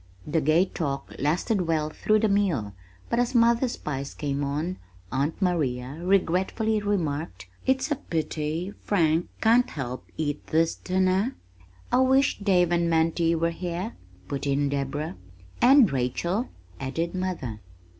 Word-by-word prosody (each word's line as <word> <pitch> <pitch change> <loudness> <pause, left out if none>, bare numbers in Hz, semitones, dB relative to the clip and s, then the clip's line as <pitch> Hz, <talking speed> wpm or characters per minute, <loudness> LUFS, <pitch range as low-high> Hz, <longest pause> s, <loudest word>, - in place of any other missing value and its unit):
The 155 +1 0
gay 155 +5 +4
talk 140 -7 -4
lasted 175 +6 0
well 155 -2 0
through 215 +6 +2
the 220 - +3
meal, 180 - +1 0.3
but 235 - 0
as 245 +1 0
mother's 235 +1 +3
pies 140 -2 -5
came 145 -1 -2
on, 150 +6 -2 0.3
Aunt 140 +5 -1
Maria 145 -7 -1
regretfully 195 +4 +1
remarked, 155 - -2 0.2
"It's 265 +3 +1
a 295 - +1
pity 160 +2 -3
Frank 165 -4 +1
can't 235 +3 +4
help 130 -3 -5
eat 150 -2 -3
this 160 +1 +2
dinner." 190 +6 0 0.6
"I 250 - +4
wish 265 +1 +3
Dave 180 -4 +3
and 170 -1 +2
Mantie 165 +1 +2
were 165 +1 +1
here," 180 +5 -4 0.3
put 140 0 -3
in 140 0 +1
Deborah. 140 -3 -3 0.4
"And 260 -4 +7
Rachel," 170 - -1 0.3
added 165 +6 -2
mother. 180 - -3
170 Hz, 135 wpm, -26 LUFS, 145-200 Hz, 0.6 s, And